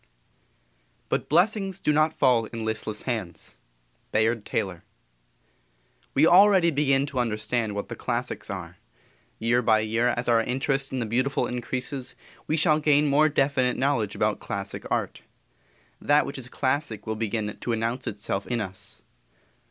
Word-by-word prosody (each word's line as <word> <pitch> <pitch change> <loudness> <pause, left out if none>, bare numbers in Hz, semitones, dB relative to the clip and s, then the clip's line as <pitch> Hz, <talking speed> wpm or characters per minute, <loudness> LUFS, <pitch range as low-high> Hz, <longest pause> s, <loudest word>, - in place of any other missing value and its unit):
"But - - -1
blessings 195 +3 +2
do 150 - +1
not 155 +1 +3
fall 125 -6 +3
in 115 0 -6
listless 110 -1 -1
hands."_ 105 -10 -5 0.5
Bayard 110 0 +1
Taylor._ 90 -4 -2 1.3
We 145 +3 +5
already 185 -1 +6
begin 140 -2 +2
to 140 -3 -4
understand 110 -1 -1
what 100 - -4
the - - -6
classics - - -3
are. - - -6 0.6
Year 120 +2 +2
by 110 -2 +3
year 115 +3 +1
as 120 - -2
our 115 -1 +4
interest 135 +3 -1
in 130 - -3
the 120 - -1
beautiful 130 +5 0
increases, 125 +2 -4 0.3
we 155 - +1
shall 155 -1 +3
gain 150 -1 +3
more 150 +2 +4
definite 135 -3 +1
knowledge 130 -6 0
about - - 0
classic - - -5
art. - - -2 0.8
That 145 +1 +3
which 140 - -6
is 125 -1 -8
classic 130 -4 -2
will 110 - -2
begin 110 -1 -2
to 120 - -4
announce 115 +3 -2
itself 100 -1 -3
in 120 -1 -1
us. 95 -1 -8
125 Hz, 150 wpm, -26 LUFS, 110-145 Hz, 1.3 s, already